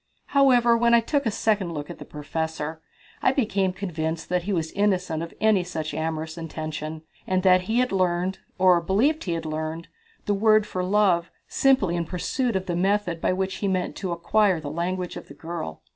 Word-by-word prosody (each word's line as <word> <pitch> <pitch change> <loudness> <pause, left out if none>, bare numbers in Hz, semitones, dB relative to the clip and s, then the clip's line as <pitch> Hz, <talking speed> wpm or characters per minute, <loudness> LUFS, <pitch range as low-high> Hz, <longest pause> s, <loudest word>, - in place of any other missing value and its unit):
However, 250 -4 +5
when 235 0 +4
I - - +7
took 280 +3 0
a - - +3
second 205 -4 0
look 150 -2 -5
at - - -10
the - - -8
professor, 160 +1 -4 0.4
I - - +4
became 200 -8 +1
convinced 165 -4 -4
that 180 0 +1
he 205 - -2
was 160 -4 -1
innocent 185 -5 0
of 170 - -5
any 215 -4 +3
such 160 -3 -4
amorous 160 +1 -3
intention, 155 -1 -5 0.2
and 185 0 +1
that 185 -1 +5
he 225 - +1
had 250 0 +2
learned, 185 0 0 0.2
or 180 -2 +5
believed 235 - +1
he 175 - -1
had 165 -1 -3
learned, 155 +1 -4 0.4
the 205 - +1
word 215 +1 +4
for 185 -3 -3
"love" 185 -3 +2 0.2
simply 260 -11 +3
in 170 -1 -1
pursuance 230 - -1
of 190 0 -1
the 175 - -2
method 185 -2 0
by - - +2
which 190 +1 -2
he 200 - -2
meant 185 -2 -1
to 185 -3 -3
acquire 180 +2 +2
the 145 -2 -6
language 180 +2 -3
of - - -9
the 140 - -12
girl. 160 - -6
180 Hz, 200 wpm, -25 LUFS, 165-205 Hz, 0.4 s, I